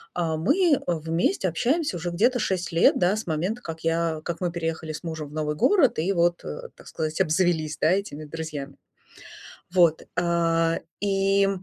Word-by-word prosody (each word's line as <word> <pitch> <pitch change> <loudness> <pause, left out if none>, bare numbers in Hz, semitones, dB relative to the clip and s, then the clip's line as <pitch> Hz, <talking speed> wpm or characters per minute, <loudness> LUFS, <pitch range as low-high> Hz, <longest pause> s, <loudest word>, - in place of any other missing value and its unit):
а 165 -2 -1
мы 295 - +3
вместе 165 +3 0
общаемся 255 - 0
уже 175 +1 -3
где-то 235 +9 +2
6 185 -5 -1
лет, 165 +1 +4
да, 180 +3 +2
с 215 -2 -5
момента, 180 +9 -2
как 165 -6 -7
я 165 -1 0
как 170 0 -4
мы 175 -1 0
переехали 165 -1 -3
с 155 - -8
мужем 160 -3 -5
в - - -14
новый 150 -1 -2
город 300 - +3
и 175 +5 +1
вот, 170 -1 +1
э, 75 - -7
так - - -16
сказать, 155 +3 -2
обзавелись, 160 -3 +1
да, 160 - +3
этими 185 -6 -2
друзьями. 150 -3 -6 1.0
Вот, 170 -4 +4 0.2
а, 165 -1 +2 0.2
и, 195 0 +2
170 Hz, 170 wpm, -25 LUFS, 160-190 Hz, 1.0 s, лет